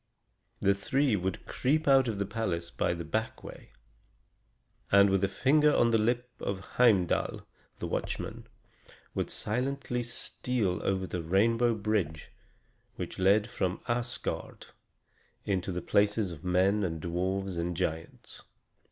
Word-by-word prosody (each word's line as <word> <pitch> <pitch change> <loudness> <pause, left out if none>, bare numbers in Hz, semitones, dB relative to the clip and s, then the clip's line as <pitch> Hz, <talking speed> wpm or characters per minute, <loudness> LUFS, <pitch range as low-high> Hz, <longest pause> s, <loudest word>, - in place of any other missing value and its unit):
They 100 - +4
three 135 +5 +1
would 95 -1 -3
creep 150 +4 0
out 135 -2 +6
of 110 -3 -2
the 100 - -1
palace 85 -6 -3
by 85 - 0
the 85 0 -6
back 110 +8 -3
way; - - -11 1.2
and, 100 0 +6
with 95 0 +2
a - - +4
finger 145 +9 +3
on 115 0 +4
the 115 - +4
lip 120 +3 +1
to 100 - -2
Heimdal, 95 -2 +1 0.3
the - - -5
watchman, - - -4 0.7
would - - -2
silently 125 +2 -2
steal 120 -4 -2
over 95 -1 0
the 90 -1 -4
rainbow 115 +7 +2
bridge 100 -8 -2 0.6
which - - -6
led 100 +3 +4
from 95 -4 -2
Asgard 120 +1 -3 0.8
into 95 -1 -1
the 90 -1 -4
places 105 -1 +2
of 80 -2 -10
men 95 +3 +2
and 80 -3 -2
dwarfs 95 +3 -2
and 85 0 -2
giants. 80 -3 -4
100 Hz, 135 wpm, -30 LUFS, 90-120 Hz, 1.2 s, out